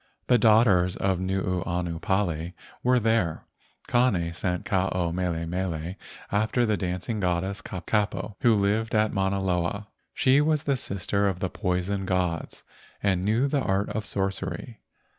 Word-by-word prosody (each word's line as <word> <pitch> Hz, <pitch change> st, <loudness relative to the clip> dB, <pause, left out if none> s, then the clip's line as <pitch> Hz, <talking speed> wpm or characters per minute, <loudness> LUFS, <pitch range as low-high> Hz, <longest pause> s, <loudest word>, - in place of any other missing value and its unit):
The 125 Hz, -1 st, +4 dB
daughters 105 Hz, -5 st, +4 dB
of 95 Hz, -2 st, 0 dB
Nuuanu 90 Hz, -2 st, -2 dB
Pali 90 Hz, -3 st, -1 dB, 0.3 s
were 125 Hz, +1 st, +3 dB
there. 110 Hz, -8 st, +1 dB, 0.4 s
Kane 100 Hz, -9 st, +2 dB
sent 90 Hz, +2 st, -2 dB
Ke 105 Hz, -, -5 dB
ao 90 Hz, -2 st, +1 dB
mele 85 Hz, -2 st, -1 dB
mele 85 Hz, -1 st, -3 dB, 0.4 s
after 110 Hz, +4 st, +2 dB
the 110 Hz, -2 st, +2 dB
dancing 90 Hz, +3 st, -3 dB
goddess, 95 Hz, +1 st, -1 dB
Kapo, 105 Hz, +2 st, -2 dB
who 115 Hz, -2 st, +4 dB
lived 105 Hz, +3 st, +1 dB
at 110 Hz, 0 st, +2 dB
Mauna 95 Hz, 0 st, 0 dB
Loa. 95 Hz, +2 st, -1 dB, 0.3 s
She 135 Hz, +2 st, +4 dB
was 155 Hz, 0 st, +1 dB
the 140 Hz, -3 st, +1 dB
sister 100 Hz, -3 st, -1 dB
of 95 Hz, -2 st, -1 dB
the 95 Hz, -, -2 dB
poison 95 Hz, 0 st, -1 dB
gods 90 Hz, -3 st, -1 dB, 0.4 s
and 95 Hz, -3 st, +1 dB
knew 110 Hz, +6 st, +2 dB
the 140 Hz, 0 st, 0 dB
art 100 Hz, -2 st, 0 dB
of 105 Hz, -2 st, -3 dB
sorcery. 100 Hz, +3 st, -3 dB
95 Hz, 145 wpm, -26 LUFS, 90-110 Hz, 0.4 s, The